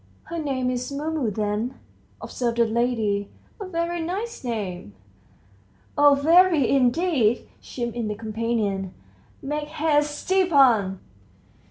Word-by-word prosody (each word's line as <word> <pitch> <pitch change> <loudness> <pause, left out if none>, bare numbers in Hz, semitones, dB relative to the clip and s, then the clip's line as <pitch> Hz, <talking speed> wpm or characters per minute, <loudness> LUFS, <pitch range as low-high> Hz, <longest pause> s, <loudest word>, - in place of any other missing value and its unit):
"Her 335 - -6
name's 255 -3 -2
Mumu 295 -3 -2
then," 210 +4 -2 0.5
observed 235 -2 -3
the 235 - +4
lady; 220 -3 0 0.3
"a 400 - -6
very 340 -1 -2
nice 395 +7 -4
name." 190 - -5 1.0
"Oh, 290 -1 +6
very, 325 -1 +4
indeed!" 260 -2 +2
chimed 240 -2 -5
in 235 -2 -2
the 210 - -3
companion. 215 -3 -2 0.5
"Make 295 +2 -3
haste, 295 -1 0
Stepan!" 270 - +3
255 Hz, 110 wpm, -24 LUFS, 220-310 Hz, 1.0 s, Oh